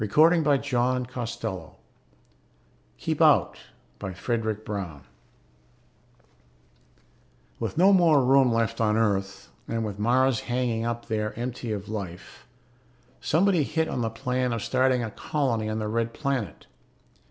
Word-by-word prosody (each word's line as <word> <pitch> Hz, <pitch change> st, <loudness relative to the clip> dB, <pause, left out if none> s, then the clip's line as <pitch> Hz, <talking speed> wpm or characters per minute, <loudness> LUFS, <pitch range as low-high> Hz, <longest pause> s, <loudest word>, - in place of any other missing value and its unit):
pgdp.net 125 Hz, -, +1 dB, 1.2 s
KEEP -, -, -2 dB
OUT -, -, +4 dB, 0.4 s
BY 95 Hz, -, -5 dB
FREDERIC 110 Hz, 0 st, -2 dB
BROWN 90 Hz, -10 st, -5 dB, 2.6 s
_With -, -, -3 dB
no 190 Hz, +4 st, +6 dB
more 160 Hz, -8 st, +5 dB
room 135 Hz, -1 st, +5 dB
left 115 Hz, -1 st, 0 dB
on 105 Hz, -1 st, +2 dB
Earth, 100 Hz, -3 st, -1 dB, 0.2 s
and 115 Hz, -1 st, -2 dB
with 105 Hz, -1 st, -6 dB
Mars 125 Hz, +2 st, +3 dB
hanging 120 Hz, -2 st, -1 dB
up 120 Hz, 0 st, -3 dB
there 105 Hz, -2 st, -3 dB
empty 120 Hz, -1 st, -4 dB
of 100 Hz, -1 st, -4 dB
life, 95 Hz, -5 st, -7 dB, 0.7 s
somebody 180 Hz, +1 st, +2 dB
hit 160 Hz, +3 st, 0 dB
on 125 Hz, -, -3 dB
the 115 Hz, -, 0 dB
plan 125 Hz, +2 st, -1 dB
of 115 Hz, -, -3 dB
starting 130 Hz, -1 st, +2 dB
a 110 Hz, -, -4 dB
colony 115 Hz, -5 st, -1 dB
on 110 Hz, -, -2 dB
the 110 Hz, -1 st, -2 dB
Red 115 Hz, +1 st, -1 dB
Planet. 135 Hz, -, -3 dB
115 Hz, 120 wpm, -26 LUFS, 110-130 Hz, 2.6 s, no